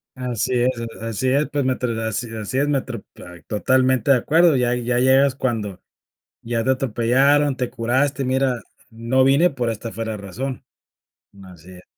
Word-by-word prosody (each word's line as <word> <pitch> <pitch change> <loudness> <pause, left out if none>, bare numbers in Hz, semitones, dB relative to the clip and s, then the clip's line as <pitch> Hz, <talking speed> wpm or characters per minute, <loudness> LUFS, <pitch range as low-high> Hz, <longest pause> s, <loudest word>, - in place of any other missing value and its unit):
Así 125 -1 -2
es, 125 +1 +2 0.3
a - - -5
a 115 - -3
así 130 +4 -1
es, 140 +3 +2
pues 145 -1 -1
mientr 130 -1 -1
Así 110 +2 -3
es, 115 - -10
así 110 +4 -4
es 145 - +2
mientr 130 -6 -2 0.2
ay 90 -1 -13
totalmente 130 +3 +1
de 130 - +6
acuerdo. 160 +3 +3
Ya 125 -1 +1
ya 120 0 -1
llegas, 130 +1 +4
cuando 110 -8 -3 0.6
ya 115 -1 -2
te 130 - +2
atropellaron, 135 +3 +2
te 125 -1 -2
curaste. 135 +4 0
"Mira, 130 -2 0 0.3
no 115 +3 +1
vine 140 +7 +4
pero 120 -4 -2
esta 115 +1 -6
fue 115 0 -5
la 110 -1 -4
razón". 120 +7 -6 0.8
Así 90 -1 -14
es. 90 0 -13
125 Hz, 180 wpm, -21 LUFS, 115-135 Hz, 0.8 s, de